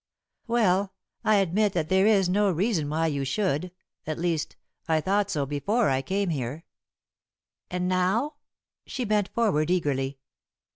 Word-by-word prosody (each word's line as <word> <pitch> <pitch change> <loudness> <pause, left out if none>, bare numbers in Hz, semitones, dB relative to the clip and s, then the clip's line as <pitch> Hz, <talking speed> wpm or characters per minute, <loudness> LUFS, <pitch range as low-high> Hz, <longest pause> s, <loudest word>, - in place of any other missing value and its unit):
"Well, 200 -5 +2 0.3
I 215 - +4
admit 200 +1 +2
that 160 -3 -1
there 190 +2 +4
is 200 -4 +4
no 200 +3 +2
reason 180 -4 0
why 160 +2 0
you 145 -3 -1
should 175 +3 -1 0.4
at 155 - -2
least, 165 -3 -1 0.3
I 160 -1 +2
thought 195 +5 +1
so 145 -2 -1
before 175 - 0
I 130 0 +1
came 195 +5 -1
here." 140 +2 -4 1.0
"And 180 0 -2
now?" 195 +11 +1 0.5
She 255 - -3
bent 210 -2 +1
forward 175 -10 +1
eagerly. 140 -6 0
180 Hz, 145 wpm, -26 LUFS, 155-205 Hz, 1.0 s, I